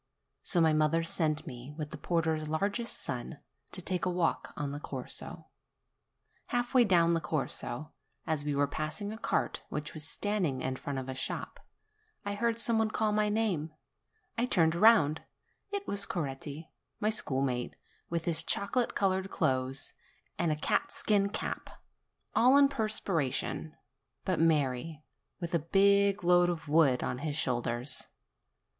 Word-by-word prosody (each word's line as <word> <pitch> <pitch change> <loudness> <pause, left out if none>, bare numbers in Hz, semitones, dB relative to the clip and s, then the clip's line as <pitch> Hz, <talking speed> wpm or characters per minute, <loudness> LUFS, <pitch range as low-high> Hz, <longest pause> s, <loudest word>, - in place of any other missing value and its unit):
So 180 - +1
my 160 -2 +5
mother 155 +2 +2
sent 155 -2 0
me, 125 +3 -8
with 150 -2 -5
the - - -6
porter's 160 -2 0
largest 200 +9 -1
son, - - -4 0.3
to - - -6
take 185 -2 -1
a 185 - +1
walk 175 -2 0
on 145 -1 -2
the 145 - -5
Corso. - - -6 1.0
Half 245 +1 -1
way 255 -2 +7
down 170 -4 +4
the 165 - +1
Corso, 150 -1 -2 0.3
as 155 -3 0
we 145 -1 -1
were 145 0 +3
passing 155 +8 -4
a - - -7
cart - - -1
which 150 0 -4
was 155 - -5
standing 175 -7 0
in 130 0 -1
front 140 +1 -4
of 130 -1 -4
a 130 - -3
shop, 130 - -4 0.7
I 205 - -1
heard 230 +2 0
some 230 -1 +2
one 220 -1 +2
call 215 0 0
me 210 - 0
by 210 0 +2
name: 195 -8 0 0.7
I 245 - +2
turned 165 -8 +3
round; 170 -6 +5 0.5
it 405 0 -3
was 200 0 +1
Coretti, 150 0 -5 0.3
my 215 +1 +1
schoolmate, 130 - 0 0.3
with 170 -1 -2
his 165 -2 +1
chocolate 200 +8 0
colored 190 -1 +1
clothes 130 -2 -1 0.4
and 155 -3 0
catskin 210 -8 +1
cap, - - -4 0.7
all 255 +4 +6
in 285 - +7
a - - +2
per 225 -6 -1
spiration, 160 -6 -1 0.5
but 185 -3 0
merry, 150 -1 +1 0.4
with 170 -2 -5
a 170 - +3
big 200 +4 +3
load 175 0 +5
of 165 -3 -4
wood 145 -4 +4
on 125 - -2
his 150 0 -3
shoulders. 125 -1 0
165 Hz, 160 wpm, -31 LUFS, 150-200 Hz, 1.0 s, way